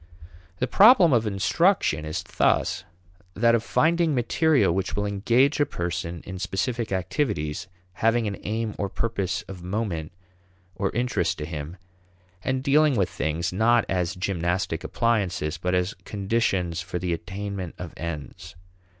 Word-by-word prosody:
The 125 - 0
problem 190 - +7
of 115 -2 +2
instruction 100 - +2
is 80 +3 -3
thus - - +1 0.5
that 115 +3 +4
of 115 - +3
finding 165 +2 +2
material 130 - +3
which 95 +1 -2
will 105 - 0
engage 115 +9 +2
a 145 - +4
person 85 -1 -4
in 95 0 -6
specific 115 +4 -2
activities 95 - -1 0.3
having 115 +3 +2
an 100 -1 -2
aim 110 0 -2
or 100 - -1
purpose 100 -2 -2
of 95 -4 -10
moment 90 -4 -3 0.6
or 95 +1 -1
interest 100 -8 0
to 75 - -4
him, 80 +2 -6 0.7
and 130 0 -1
dealing 150 0 +4
with 95 -5 +1
things 80 +3 -2
not 115 +3 +3
as 90 -1 -1
gymnastic 90 -2 -1
appliances 90 -9 0
but 90 +2 0
as 90 +2 0
conditions 95 -5 -1
for 90 - -4
the 90 -1 -1
attainment 95 +1 -5
of 90 -2 -7
ends. 85 +2 -7
95 Hz, 140 wpm, -25 LUFS, 85-115 Hz, 0.7 s, problem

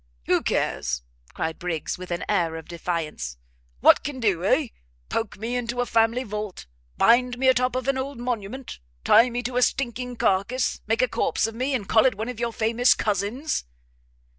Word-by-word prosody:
"Who - - +2
cares?" 65 -1 -1 0.3
cried 160 0 -3
Briggs, 175 -4 -3
with 185 - -8
an 175 -1 -3
air 165 -2 +1
of 160 -1 -8
defiance, 165 - -4 0.4
"what - - +6
can 275 -1 -4
do, 195 -7 +1
eh? 255 +6 +2 0.4
poke 225 -4 -2
me 230 +4 -3
into 245 0 -2
a 245 - +2
family 230 +2 +2
vault? 210 - -5 0.3
bind 245 +1 +4
me 260 +1 +1
o' - - +7
top 250 0 0
of 255 +1 -2
an 275 -1 +1
old 275 0 -4
monument? 245 +1 -4 0.2
tie 230 +4 +6
me 245 +1 -3
to 245 0 -3
a - - +3
stinking 250 -1 -1
carcase? 225 +5 0
make 225 +3 +2
a - - +3
corpse - - 0
of 225 - -3
me, 260 +4 -1
and 205 -6 -3
call 225 +3 +5
it 250 - 0
one 220 +4 -4
of 245 -3 -6
your 235 0 -1
famous 230 +3 +3
cousins? 210 - -1
230 Hz, 190 wpm, -25 LUFS, 195-250 Hz, 0.4 s, o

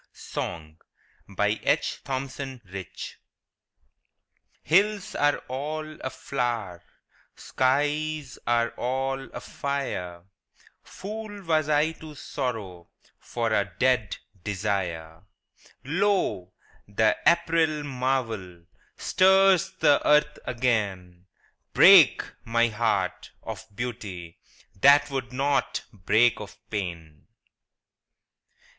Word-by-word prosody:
Carroll 80 -2 -5 0.5
Lane 105 +2 0 0.2
Fenton 135 0 -4 0.3
SONG - - -24 2.0
Hills 200 +4 +2
are 145 0 +2
all 155 +4 -4
aflower, 120 -8 -3 0.5
Skies 145 +1 -1
are 120 0 +2
all 135 +2 -2
afire 110 -12 -4 0.3
— - - -29
Fool 210 0 -7
was 155 -3 +1
I 150 +2 +3
to 160 -2 -11
sorrow 110 - -5 0.3
For 115 -2 -2
a 100 -3 0
dead 125 -5 +1 0.3
desire! 90 -6 -3 0.6
Lo, 150 - 0 0.4
the 110 +2 +2
April 160 -3 +3
marvel 125 -10 -2 0.3
Stirs 190 -1 +4
the 145 -2 +5
earth 150 0 +3
again: 100 -8 -2 0.5
Break, - - +8 0.2
my 115 +1 +2
heart, 105 -4 -1
of - - -7
beauty, 100 -8 -6 0.4
That 140 +4 +6
would 130 -3 -3
not 140 +2 0
break 110 +5 +3
of 105 0 -9
pain 85 -7 -5
125 Hz, 85 wpm, -26 LUFS, 100-150 Hz, 2.0 s, Break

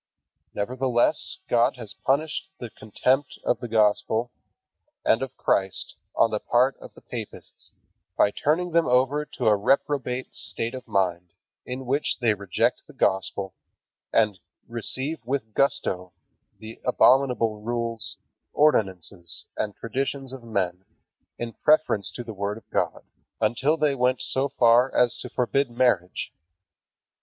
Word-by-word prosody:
Nevertheless 125 - 0
God 120 +1 +3
has 110 -5 -7
punished 140 - -1
the 120 -2 -7
contempt 130 +6 0
of - - +1
the 120 - -5
Gospel 110 +1 +2 0.7
and 115 - +4
of 135 - -5
Christ 95 -1 0 0.2
on 115 - +4
the 105 - 0
part 125 +5 +2
of - - -13
the - - -16
papists, - - -7 0.4
by 100 - +4
turning 165 +10 0
them 165 0 +3
over 135 +4 +2
to 125 - -6
a 110 -1 +6
reprobate 130 +3 0
state 115 +2 -2
of 130 -1 -8
mind 90 -3 0 0.3
in 130 +1 -5
which 140 +4 0
they 115 -4 +2
reject 100 -3 0
the - - -14
Gospel, 95 0 0 0.6
and 105 -4 +2 0.3
receive 130 +7 -2
with 120 -3 -3
gusto 90 -9 0 0.4
the 110 +1 -11
abominable 125 -4 +3
rules, 115 0 -3 0.4
ordinances, 95 - +1
and 105 -2 -2
traditions 135 +3 -3
of 135 - -8
men 95 -5 -2 0.5
in 120 -1 -5
preference 150 - +2
to 120 - -5
the 115 -2 -7
Word 100 +1 -3
of 115 - -15
God, - - -1 0.4
until 125 +8 +2
they 150 -2 +2
went 125 -1 +1
so 135 +2 +2
far 125 -1 +4
as 125 -1 +3
to 125 - -6
forbid 130 +2 0
marriage. 120 -7 0
120 Hz, 135 wpm, -25 LUFS, 105-135 Hz, 0.7 s, a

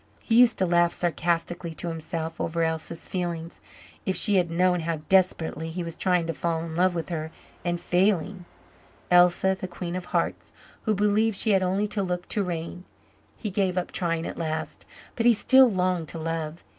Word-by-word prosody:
He 230 - -1
used 235 0 +6
to 190 - +2
laugh 175 -1 +3
sarcastically 170 0 -1
to 175 - -4
himself 165 0 -4
over 165 0 -1
Elsa's 160 0 -3
feelings 170 -2 -4 0.4
if 190 - -1
she 200 +3 +4
had 175 -2 +2
known 180 +1 +2
how 165 0 -2
desperately 170 -4 +1
he 175 +2 -4
was 165 -1 -6
trying 180 -3 +1
to 165 - -2
fall 165 -2 -2
in 160 -1 -7
love 180 +1 +2
with 165 +1 -4
her 160 -2 -3 0.3
and 175 -1 -1
failing 185 0 0 0.7
Elsa 180 +2 +5
the 185 - -3
queen 175 -1 -6
of 185 -1 -4
hearts, - - -2 0.3
who 215 -2 +2
believed 210 +1 +2
she 220 - +2
had 195 -1 +4
only 190 +3 +1
to 210 0 -2
look 180 -2 -3
to 210 - 0
reign. 175 0 -5 0.5
He 210 - -4
gave 190 -1 0
up 180 - -2
trying 165 -2 0
at - - -6
last, 160 -1 -4 0.3
but 235 0 +2
he 235 - +6
still 260 +3 +6
longed 180 -3 0
to 165 - -5
love. 165 0 -4
175 Hz, 190 wpm, -26 LUFS, 165-190 Hz, 0.7 s, used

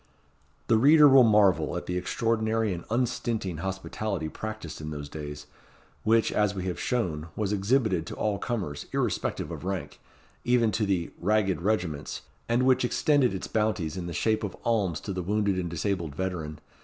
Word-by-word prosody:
The 110 - +3
reader 150 +4 +7
will 135 -1 +8
marvel 100 -8 +4
at - - -5
the 90 - -3
extraordinary 110 +2 0
and 85 -1 -7
unstinting 115 -6 -1
hospitality 95 -1 -3
practised 110 -8 -6
in 75 - -5
those 75 -1 -6
days, 75 -1 -7 0.6
which, 115 +1 +3
as 105 -1 +1
we 95 -1 -4
have 90 -2 -3
shown, 85 -11 -1
was 105 -1 -1
exhibited 100 -4 +1
to - - -6
all 105 -2 -1
comers, 90 -12 -3
irrespective - - -1
of - - -7
rank, 95 0 -4 0.4
even 120 -2 +3
to 105 0 0
the 90 -4 0
"ragged 95 -3 +1
regiments," 90 -7 -2 0.3
and 120 +2 +2
which 130 -1 +4
extended 130 -2 +2
its 95 - -4
bounties 105 -8 -1
in 90 -2 -4
the - - -4
shape 110 +7 +1
of 100 - -4
alms 100 -8 +1
to 100 - -4
the 90 - -3
wounded 100 +1 0
and 85 -1 -2
disabled 85 -2 -2
veteran. 85 -5 -3
100 Hz, 170 wpm, -27 LUFS, 85-110 Hz, 0.6 s, will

